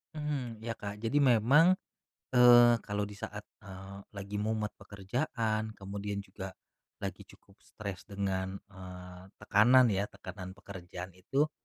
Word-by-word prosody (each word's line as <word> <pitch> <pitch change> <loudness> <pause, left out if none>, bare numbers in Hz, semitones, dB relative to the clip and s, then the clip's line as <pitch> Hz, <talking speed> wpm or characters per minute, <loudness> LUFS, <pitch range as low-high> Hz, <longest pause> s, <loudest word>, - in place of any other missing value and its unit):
Hmm. 135 -7 -3
Iya 115 0 -4
Kak. 100 0 -6
Jadi 115 +6 0
memang, 140 - +6 0.6
eee, 120 -1 +8
kalau 105 0 -1
di 105 0 -6
saat, - - -6 0.2
eee, 95 0 -10 0.2
lagi 100 +1 -4
mumet 110 -1 -1
pekerjaan 110 +1 -2
kemudian 100 +1 -5
juga 95 -1 -8 0.5
lagi - - -5
cukup 100 - -20
stres 100 -3 -8
dengan, 95 -2 -2 0.2
eee, 90 -1 -10
tekanan 115 +4 +5
ya, 100 +1 0
tekanan 95 -1 -9
pekerjaan 90 -2 -8
itu, 135 - 0
105 Hz, 130 wpm, -31 LUFS, 95-115 Hz, 0.6 s, eee